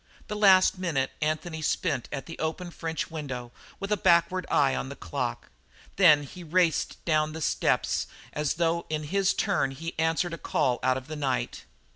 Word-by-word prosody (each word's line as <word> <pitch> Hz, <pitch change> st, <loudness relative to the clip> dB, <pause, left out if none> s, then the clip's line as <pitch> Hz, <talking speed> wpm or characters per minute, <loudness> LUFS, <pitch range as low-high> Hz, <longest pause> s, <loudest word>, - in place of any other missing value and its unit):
The 210 Hz, -, -3 dB
last 190 Hz, -3 st, +5 dB
minute 150 Hz, -8 st, 0 dB
Anthony 155 Hz, +1 st, -2 dB
spent 150 Hz, -, -1 dB
at 135 Hz, -, -4 dB
the 165 Hz, -, -9 dB
open 170 Hz, +3 st, -3 dB
French 165 Hz, -1 st, -4 dB
window 130 Hz, -6 st, -5 dB, 0.3 s
with 195 Hz, +1 st, -5 dB
a 210 Hz, -, +3 dB
backward 180 Hz, 0 st, +3 dB
eye 135 Hz, -2 st, +3 dB
on 130 Hz, -, -3 dB
the 140 Hz, -, -7 dB
clock; 85 Hz, -10 st, -4 dB, 0.5 s
then 155 Hz, -6 st, +6 dB
he 175 Hz, +6 st, -10 dB
raced 170 Hz, 0 st, +1 dB
down 155 Hz, -1 st, +1 dB
the 160 Hz, -, -5 dB
steps -, -, +1 dB, 0.3 s
as 150 Hz, -2 st, -1 dB
though 170 Hz, 0 st, 0 dB
in 155 Hz, -1 st, -2 dB
his 195 Hz, +5 st, +1 dB
turn 195 Hz, -9 st, +1 dB
he 160 Hz, +5 st, -6 dB
answered 165 Hz, +2 st, +1 dB
a 165 Hz, -, -6 dB
call 130 Hz, -5 st, 0 dB
out 130 Hz, 0 st, +2 dB
of 130 Hz, -, -7 dB
the 155 Hz, -, -6 dB
night. 135 Hz, -4 st, -2 dB
160 Hz, 180 wpm, -27 LUFS, 145-175 Hz, 0.5 s, then